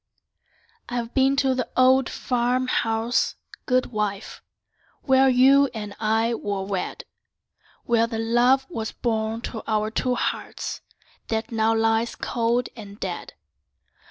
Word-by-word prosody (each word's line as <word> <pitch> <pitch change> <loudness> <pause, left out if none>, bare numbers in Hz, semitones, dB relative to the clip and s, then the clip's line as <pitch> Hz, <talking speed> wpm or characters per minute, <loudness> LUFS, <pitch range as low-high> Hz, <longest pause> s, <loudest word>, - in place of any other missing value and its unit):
I've 240 -1 -3
been 270 0 +3
to 270 -2 +2
the 255 0 -2
old 260 0 +5
farm 250 +1 0
house, 225 0 0 0.3
good 255 0 +1
wife, 210 -2 -3 0.6
Where 265 -1 +4
you 270 +2 +5
and 210 -2 -6
I 225 +2 +1
were 200 -4 -3
wed; 195 -1 -4 0.8
Where 230 -1 +2
the 230 -1 -4
love 240 +4 +3
was 220 -4 -4
born 225 -1 -2
to 225 -2 -5
our 215 0 0
two 250 +2 0
hearts - - -3 0.5
That 225 +2 -2
now 225 0 +2
lies 225 +1 +1
cold 235 +1 -1
and 205 -2 -11
dead. 180 -2 -5
230 Hz, 130 wpm, -24 LUFS, 220-255 Hz, 0.8 s, old